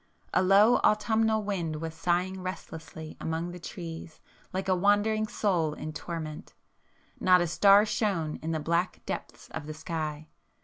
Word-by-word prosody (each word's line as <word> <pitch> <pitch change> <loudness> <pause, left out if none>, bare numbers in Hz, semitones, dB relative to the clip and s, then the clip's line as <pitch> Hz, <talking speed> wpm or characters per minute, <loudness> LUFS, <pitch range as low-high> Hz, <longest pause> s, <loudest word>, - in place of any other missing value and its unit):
A - - +4
low 200 +5 +6
autumnal 220 0 +2
wind 175 -6 -2
was 160 +1 -5
sighing 180 +3 0
restlessly 160 -3 -7
among 165 +2 -2
the 180 - -8
trees 165 -2 -8 0.3
like 190 +1 -3
a 185 - +3
wandering 205 +3 +2
soul 170 -9 0
in 155 - -6
torment; 155 -1 -6 0.6
not 180 -1 +5
a 175 - +2
star 195 +5 +6
shone 195 -8 -1
in 160 - -5
the 160 -1 0
black 170 +4 -1
depths - - -6
of 150 - -6
the 155 - -6
sky. 155 -1 -4
175 Hz, 150 wpm, -29 LUFS, 160-200 Hz, 0.6 s, low